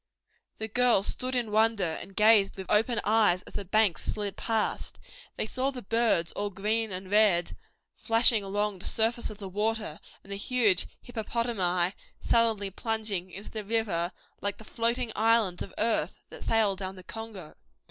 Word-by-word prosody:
The 220 - -3
girls 240 -3 +4
stood 255 0 -1
in 235 -4 -1
wonder 215 -6 +2
and 195 - -12
gazed 210 -2 +5
with 190 - -7
open 225 +3 +3
eyes 210 -4 +3
as - - -12
the 205 - -4
banks 195 -4 +2
slid 205 -2 -3
past. 225 -2 -1 0.4
They - - -2
saw 255 +4 0
the 255 -3 -7
birds 225 -6 +2
all 205 0 -3
green 215 +3 -1
and 185 +1 -6
red 205 -5 +3 0.4
flashing 225 -2 +3
along 205 0 -2
the - - -5
surface 230 +1 +1
of 215 - -9
the 200 -2 -7
water, 210 -3 -2 0.2
and 200 - -14
the 200 - -4
huge 210 -4 +2 0.2
hippopotami 215 -6 -1 0.3
sullenly 225 -4 +2
plunging 215 -4 -2
into 195 +3 -10
the 215 -1 -5
river 200 -5 0 0.3
like 200 0 -2
the - - -13
floating 235 +2 -1
islands 220 -4 +2
of - - -5
earth 225 +1 0
that - - -9
sail 220 -3 +2
down 190 0 -6
the 185 - -12
Congo. 215 -5 -8
215 Hz, 170 wpm, -28 LUFS, 195-225 Hz, 0.4 s, gazed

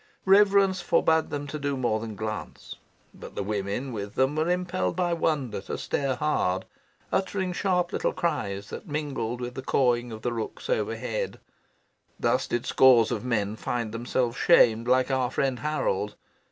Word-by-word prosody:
Reverence 195 -1 +5
forbade 160 -2 +2
them 145 0 -4
to 150 +1 -5
do 140 -1 -1
more 120 -4 0
than 110 -1 -6
glance. 110 +1 -6 0.4
But - - -11
the 100 - -2
women 105 +6 -3
with 100 -1 -5
them 130 +3 +2
were 155 +2 +1
impelled 180 - -1
by 175 -1 +1
wonder 140 -11 -1
to - - -5
stare 135 -2 -1
hard, 110 -9 0 0.5
uttering 190 -1 0
sharp 180 -2 0
little - - 0
cries 130 - -2
that - - -7
mingled 140 -6 -3
with 125 0 -5
the 130 - -5
cawing 120 -2 +1
of 110 -1 -8
the 120 - -1
rooks 115 - -5
overhead. - - -2 0.8
Thus - - +1
did 120 0 -2
scores 125 -4 +5
of - - -2
men 110 -4 -1
find 115 -1 -3
themselves 120 +1 -1
shamed 115 -8 +5
like 130 +2 +3
our 130 -2 +1
friend 130 -1 -1
Harold. 115 -8 -1
130 Hz, 165 wpm, -27 LUFS, 115-160 Hz, 0.8 s, Reverence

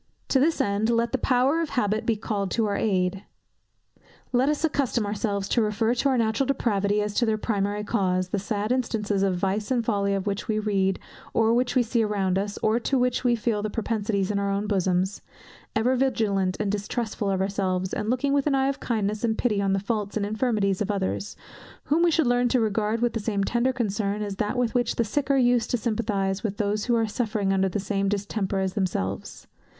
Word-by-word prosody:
To 270 - +3
this 315 +5 +2
end, 205 +2 +1
let 235 0 +1
the 265 - 0
power 260 +6 +2
of 325 - -2
habit 215 -1 0
be 230 - +3
called 205 -2 -2
in - - -1
to 225 - +2
our 205 -1 -1
aid. 190 -2 0 1.1
Let 255 +3 +3
us 300 +1 -1
accustom 265 -7 0
ourselves 205 -1 -2
to 235 - +2
refer 220 +2 +1
to 250 +3 +1
our 260 - +2
natural 230 +3 +1
depravity, 210 -6 +1
as 210 0 -3
to 240 - +2
their 220 -1 +1
primary 205 -1 -1
cause, 185 -4 0
the 200 - -1
sad 210 +2 -2
instances 220 -5 0
of 195 -2 +2
vice 195 +3 -1
and 245 -3 +1
folly 200 -3 +1
of 195 - -3
which 200 0 -3
we 215 - 0
read, 195 -3 +1 0.4
or 225 0 +4
which 245 +2 +1
we 250 - +4
see 230 0 0
around 195 -3 0
us, 205 +1 -3
or 220 +2 +3
to 265 +3 0
which 250 0 +1
we 245 -1 +3
feel 220 -2 -1
the 215 - -2
propensities 210 -3 -1
in 200 - 0
our 200 0 -1
own 200 +1 -1
bosoms; 190 -1 0 0.5
ever 240 +4 +2
vigilant 210 -8 +1
and 210 -2 0
distrustful 210 0 -2
of 190 -1 0
ourselves, 190 -1 -1
and 210 +1 -2
looking 255 +3 +1
with 280 0 +2
an 285 - +2
eye 270 0 +2
of 275 - -3
kindness 215 -2 -2
and 220 -2 +1
pity 210 -5 +1
on 195 -1 +1
the 195 - +1
faults 205 0 -2
and 205 - 0
infirmities 210 -3 0
of 210 - -1
others, 200 0 -2 0.5
whom 310 +3 +1
we 345 - +5
should 320 -2 +2
learn 245 0 +3
to 250 - +2
regard 220 0 0
with 240 - +1
the 225 - -1
same 205 -2 -1
tender 240 +5 +1
concern 210 -4 -1
as 200 -2 -5
that 210 +5 -1
with 245 -2 0
which 245 -2 +1
the 235 - +2
sick 265 +6 -2
are 275 - +4
used 245 -2 +3
to 245 - +1
sympathize 205 -4 -1
with 205 -2 -3
those 210 0 -1
who 240 - +2
are 225 -1 +2
suffering 210 -3 -1
under 190 0 +2
the 195 - -2
same 195 0 -1
distemper 200 -1 -2
as 190 -1 -1
themselves. 170 - -3
210 Hz, 225 wpm, -25 LUFS, 200-240 Hz, 1.1 s, we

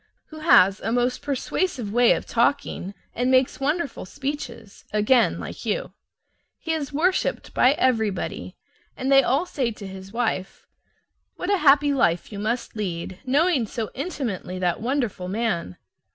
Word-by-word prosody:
Who 310 - -10
has 200 - +5
a 225 - -3
most 245 +1 0
persuasive 275 - -2
way 245 0 +5
of - - -4
talking 235 -5 0 0.2
and 250 +2 0
makes 260 0 +3
wonderful 295 +2 -1
speeches 245 -7 -6
(again 215 +4 +3
like - - -7
you). - - -2 0.6
He 325 - -3
is 300 -3 -3
worshiped 350 +6 0
by 255 +2 +5
everybody, 225 - -1 0.4
and 260 +2 -1
they 270 0 +8
all 275 +6 +1
say 265 -8 -1
to 215 -2 -8
his 190 0 -9
wife, 220 -5 -2 0.7
"What 360 - -3
a - - +3
happy 290 -2 +5
life 175 -10 +1
you 205 - -6
must 230 +4 -2
lead, 185 -3 -4
knowing 285 -2 +2
so 220 0 -4
intimately 255 - -4
that 180 0 -1
wonderful 235 -7 -1
man!" 190 - -2
245 Hz, 150 wpm, -24 LUFS, 205-285 Hz, 0.7 s, they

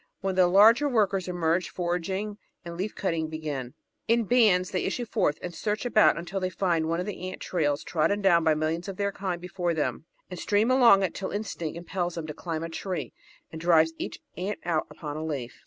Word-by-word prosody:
When 195 0 -1
the 185 -1 +4
larger 225 +10 +6
workers 200 -6 +1
emerge, 175 0 0
foraging 190 +4 -3 0.3
and 170 0 -6
leaf 195 +5 -4
cutting 165 -4 -1
begin. 150 -4 -5 0.3
In 230 +1 +3
bands 205 -5 +3
they 185 - -1
issue 245 - -2
forth 195 -10 0
and 175 - -5
search 210 +6 -2
about 215 -7 +4
until 175 +3 -4
they 185 -1 -1
find 170 -3 0
one 165 +1 0
of 180 - -2
the 185 -3 -5
ant 185 - -8
trails 150 -5 -1
trodden 175 +5 +1
down 175 -4 +4
by 160 -1 +3
millions 160 +4 -2
of 195 -2 -6
their 200 -1 0
kind 190 -3 -3
before 175 -1 -2
them, 155 +1 -2 0.2
and 180 -2 -8
stream 215 +4 +2
along 235 -7 +6
it 185 - -1
till 190 - -4
instinct 175 -6 -4
impels 175 0 -3
them 165 -2 -4
to 155 - -6
climb 165 0 -4
a 165 - -4
tree 180 +2 -4 0.4
and 160 - -7
drives 165 -1 +4
each - - -5 0.2
ant 195 +4 -3
out 165 -3 0
upon 150 -2 -7
a 155 - -4
leaf. 140 -6 -5
180 Hz, 210 wpm, -27 LUFS, 165-200 Hz, 0.4 s, larger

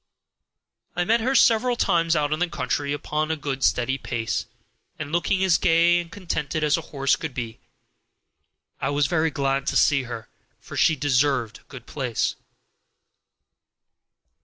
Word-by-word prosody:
I 175 - +1
met 230 +4 +3
her 260 +4 0
several 240 +1 +4
times 165 -6 +2
out 150 -1 +1
in 155 - -3
the 180 0 0
country, 140 0 -2
going 155 +1 -2
a 160 - 0
good 140 -3 -4
steady 120 +11 +1
pace, 115 -2 -3 0.5
and 150 -1 -6
looking 175 +3 +1
as 185 -2 +3
gay 170 0 +4
and 170 -1 -7
contented 165 -5 -3
as 150 -1 +3
a 165 - -2
horse 135 -1 +1
could 155 -6 -6
be. 115 -3 -5 1.2
I - - 0
was 145 0 +1
very 160 +2 +1
glad 135 -1 -1
to - - +1
see 140 -2 +4
her, 115 -2 -7 0.3
for - - -11
she 160 -1 +3
deserved 135 -4 +1
a - - -26
good 125 -3 -10
place. 125 -6 -2
150 Hz, 160 wpm, -24 LUFS, 135-170 Hz, 1.2 s, several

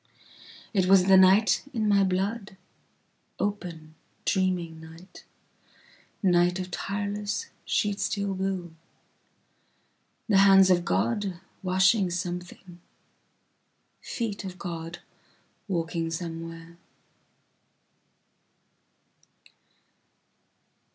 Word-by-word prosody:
It 190 -3 +2
was 190 -1 +6
the 190 0 +6
night 190 +3 +5
in 220 -2 0
my 200 -1 +4
blood:open 190 -3 -5 0.3
dreaming 180 -5 0
night, 165 +3 -14 1.0
night 175 -1 +3
of 185 0 -5
tireless 205 - -3
sheet 205 -1 0
steel 200 0 -1
blue:The 185 +2 -7
hands 195 -1 +7
of 175 -1 +3
God 200 -4 -1 0.2
washing 190 +1 +3
something, 175 0 -6 1.2
feet 215 -4 -4
of 185 -1 -7
God 170 -2 -6 0.7
walking 165 -3 -2
somewhere. 165 0 -7
185 Hz, 70 wpm, -27 LUFS, 175-200 Hz, 1.2 s, hands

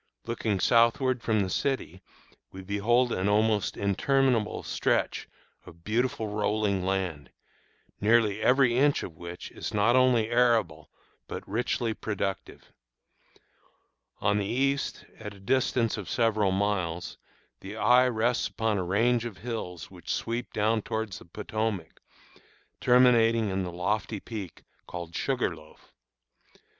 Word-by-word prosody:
Looking 110 -4 -1
southward 120 +4 +3
from 110 -2 +1
the 95 - -1
city 110 - -2 0.5
we 95 0 -9
behold 115 +6 +1
an 95 0 0
almost 105 -1 +1
interminable 115 +3 +1
stretch - - -1 0.3
of 85 0 -15
beautiful 115 +1 -1
rolling 105 -2 0
land, 90 -8 -2 0.7
nearly 110 -1 +3
every 125 0 +4
inch 145 +3 +3
of 85 - -8
which 85 +2 -8
is - - -6
not 110 +4 +3
only 125 -3 +3
arable 115 -11 +2 0.4
but - - -7
richly 115 +1 -1
productive. 100 -3 -5 1.5
On 105 +1 +1
the 100 - -1
east, 135 +5 -1
at 105 -2 -8
a - - -15
distance 115 +2 +1
of 100 -5 -6
several 110 -4 +2
miles, 95 -4 -2 0.4
the 100 +2 -8
eye 125 +3 +5
rests 120 0 +1
upon 110 -3 -1
a - - -1
range 115 +6 +2
of 115 -5 -6
hills 105 -8 -6
which - - -7
sweep 120 +1 -3
downward 110 0 +1
toward 110 -1 -3
the - - -9
Potomac, 105 0 -4 0.8
terminating 115 -3 +4
in 95 +1 -1
the 90 -1 -4
lofty 100 +4 -2
peak 100 -5 -8 0.2
called 85 -1 -7
Sugarloaf. 85 - -3
110 Hz, 130 wpm, -28 LUFS, 95-120 Hz, 1.5 s, eye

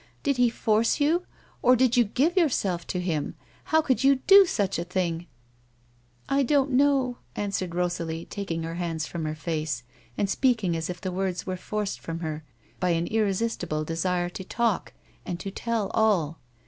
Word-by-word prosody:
" - - -35
Did 280 -3 +1
he 245 -1 +4
force 225 +3 +1
you, 330 +5 +2 0.3
or 250 +1 +6
did 255 0 +3
you 245 - +6
give 280 - +1
yourself 200 - +1
to 180 - -2
him? 165 -5 -2 0.3
How 315 0 +3
could 265 -3 +1
you 275 +1 +6
do 390 +8 +7
such 195 - 0
a - - -1
thing? 175 -1 -2 0.5
" 120 0 -36 0.2
"I 275 0 +2
don't 275 +1 +2
know," 265 -2 +2 0.2
answered 190 -4 -2
Rosalie, 170 -2 -2
taking 170 -5 -4
her 165 0 -4
hands 165 -2 -2
from 165 +1 -4
her 155 0 -2
face 155 -4 -3 0.3
and 200 - +1
speaking 215 -5 +1
as 165 +1 -3
if 180 0 -5
the 185 - -3
words 185 -1 -2
were 185 - -2
forced 210 +2 -3
from 165 0 -6
her 155 -1 -4 0.4
by 180 - +1
an 165 - -1
irresistible 200 -6 0
desire 175 +2 -1
to 190 - -7
talk 230 +2 -1 0.3
and 175 -1 -4
to 195 - -5
tell 225 -1 -2
all. 185 -8 +2
190 Hz, 185 wpm, -26 LUFS, 170-245 Hz, 0.5 s, do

